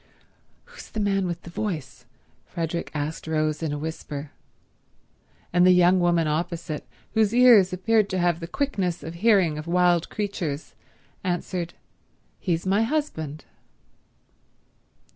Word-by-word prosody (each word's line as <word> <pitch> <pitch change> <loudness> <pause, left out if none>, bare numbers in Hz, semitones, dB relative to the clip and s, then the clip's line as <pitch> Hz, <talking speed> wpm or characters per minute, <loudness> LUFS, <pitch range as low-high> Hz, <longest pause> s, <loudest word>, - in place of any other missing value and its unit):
"Who's 485 0 -13
the 220 - -5
man 195 -2 +1
with 175 0 -5
the 170 - -10
voice?" 145 - -5 0.4
Frederick 170 -1 -3
asked 150 +2 -3
Rose 155 -1 0
in 160 -2 -1
a 145 - -2
whisper; 150 -1 -6 1.2
and 175 0 +5
the 185 - +7
young 180 0 +5
woman 170 -2 +2
opposite, 165 0 -3 0.3
whose 220 0 +2
ears 235 -7 +7
appeared 205 +3 +2
to 185 - -1
have 175 -2 +1
the 165 - -6
quickness 185 - -2
of 160 +2 -6
hearing 180 -5 +3
of 155 - -8
wild 175 -1 +3
creatures, 175 -8 -4 0.5
answered, 175 -1 -3 0.6
"He's 170 -2 -1
my 195 +3 +2
husband." 225 - -2
175 Hz, 130 wpm, -25 LUFS, 160-195 Hz, 1.2 s, the